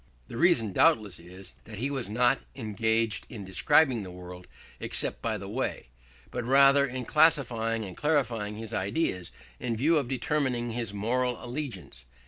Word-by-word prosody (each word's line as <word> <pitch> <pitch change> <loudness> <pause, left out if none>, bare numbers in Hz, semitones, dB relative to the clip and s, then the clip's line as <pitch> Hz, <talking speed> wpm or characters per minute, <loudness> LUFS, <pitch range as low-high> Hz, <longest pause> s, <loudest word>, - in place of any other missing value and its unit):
The - - -8
reason 120 - +3
doubtless 110 - +3
is 90 +3 -11
that 105 -2 -9
he 135 +6 -2
was 130 -7 -3
not 125 +4 +2 0.2
engaged 110 -1 -1
in 105 -5 -8
describing 130 - +3
the 95 - -7
world, 90 0 -10 0.3
except - - -2
by 110 -2 -1
the 100 -1 -8
way, 105 - -3 0.4
but 125 - -3
rather 140 +2 +5
in 125 -1 -5
classifying 115 -8 +2
and 95 -2 -8
clarifying 120 -9 0
his 110 0 -7
ideas 95 - -1 0.3
in 115 -2 -2
view 155 +7 +3
of 140 - -4
determining 130 -2 -1
his 115 -2 -3
moral 120 +4 -1
allegiance. 120 - -6
115 Hz, 155 wpm, -28 LUFS, 105-135 Hz, 0.4 s, rather